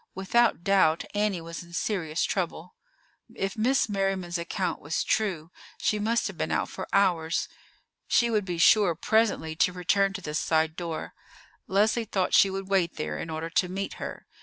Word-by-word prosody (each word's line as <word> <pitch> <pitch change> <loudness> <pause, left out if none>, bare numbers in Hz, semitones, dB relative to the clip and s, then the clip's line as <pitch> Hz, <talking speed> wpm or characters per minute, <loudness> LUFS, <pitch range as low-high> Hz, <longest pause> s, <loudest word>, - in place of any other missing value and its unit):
Without 195 +1 +2
doubt, 185 -5 +3
Annie 205 -4 0
was 165 0 -7
in 170 0 -14
serious 175 -4 -1
trouble. 180 -2 -3 0.6
If 195 +2 -2
Miss 245 +4 +2
Merriman's 195 -4 -1
account 170 +1 -3
was 145 +3 -1
true, 180 -7 -1 0.3
she 210 - 0
must 225 +3 +1
have - - -5
been - - -1
out - - 0
for - - -6
hours. 170 -5 +2 0.6
She 235 -1 +3
would 210 -2 +1
be 180 -2 -4
sure 180 0 +5
presently 210 -5 +1
to 180 - +3
return 195 +2 +1
to 195 - -6
this 150 -3 -2
side 160 0 +1
door. 165 -2 -5 0.5
Leslie 215 +4 +2
thought 190 -3 -1
she 195 - +6
would 195 0 -5
wait 190 -3 +1
there 75 -1 -4
in 165 - -5
order 160 +1 -4
to 180 +1 +1
meet 195 +2 -4
her. - - -6
185 Hz, 175 wpm, -27 LUFS, 165-205 Hz, 0.6 s, she